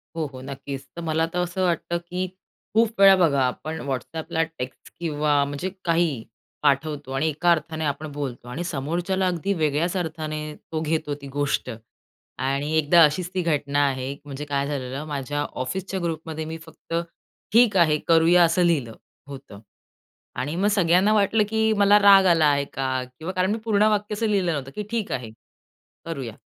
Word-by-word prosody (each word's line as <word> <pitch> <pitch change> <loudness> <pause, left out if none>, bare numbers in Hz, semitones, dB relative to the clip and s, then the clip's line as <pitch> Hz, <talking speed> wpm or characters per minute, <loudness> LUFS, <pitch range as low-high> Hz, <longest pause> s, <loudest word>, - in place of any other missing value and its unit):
हो, 160 -2 -1
हो, 130 - -9
नक्कीच. 135 0 -7
तर 170 - -6
मला 160 0 0
तर 180 - -1
असं 180 +1 -1
वाटतं, 170 -1 0
की 180 +2 -4 0.5
खूप 225 -1 +2
वेळा 195 -1 +9
बघा 160 -7 +3
आपण 155 +5 -4
WhatsAppला 160 +5 -2 0.2
टेक्स्ट 125 +1 -7
किंवा 150 -3 +1
म्हणजे 145 +6 -4 0.2
काही 170 -2 +2 0.5
पाठवतो 145 -1 0
आणि 140 +4 0
एका 155 +3 +2
अर्थाने 160 -1 -1
आपण 150 +2 -2
बोलतो 135 -4 -5
आणि 145 +8 -4
समोरच्याला 175 +4 -1
अगदी 180 +3 -1
वेगळ्याच 155 +5 +1
अर्थाने 155 -3 -4 0.2
तो 160 -1 -2
घेतो 155 -1 -1
ती 140 - -8
गोष्ट. 145 -2 -1 0.7
आणि 140 +3 -1
एकदा 160 +3 +5
अशीच 165 +4 +2
ती 185 - 0
घटना 145 -4 0
आहे. 130 0 -3
म्हणजे 145 +1 -6
काय 140 -1 -1
झालेलं, 140 0 -4
माझ्या 145 -1 -3 0.2
ऑफिसच्या 190 +8 -4
ग्रुपमध्ये 160 -1 -4
मी 160 +1 -5
फक्त 160 +1 -12 0.6
ठीक 230 -3 +5
आहे, 155 -4 +4
करूया, 165 +2 +5
असं 170 +2 +1
लिहिलं 140 -10 +1 0.3
होतं. 135 -7 -10 0.8
आणि 140 +6 -3
मग 195 +4 +1
सगळ्यांना 185 +2 +3
वाटलं, 210 +1 +3
की 220 0 +2
मला 205 +1 +6
राग 200 -1 +7
आला 165 -4 +4
आहे 140 -1 +2
का? 130 -1 -1 0.2
किंवा 165 +4 -5
कारण 185 +1 +1
मी 220 - 0
पूर्ण 210 -2 +3
वाक्य 210 0 -1
असं 220 +2 -1
लिहिलं 195 -5 +1
नव्हतं, 135 -3 -4
की 210 - -3
ठीक 230 -3 -2
आहे, 125 -3 -3 0.8
करूया. 135 -9 -5
160 Hz, 170 wpm, -24 LUFS, 140-180 Hz, 0.8 s, वेळा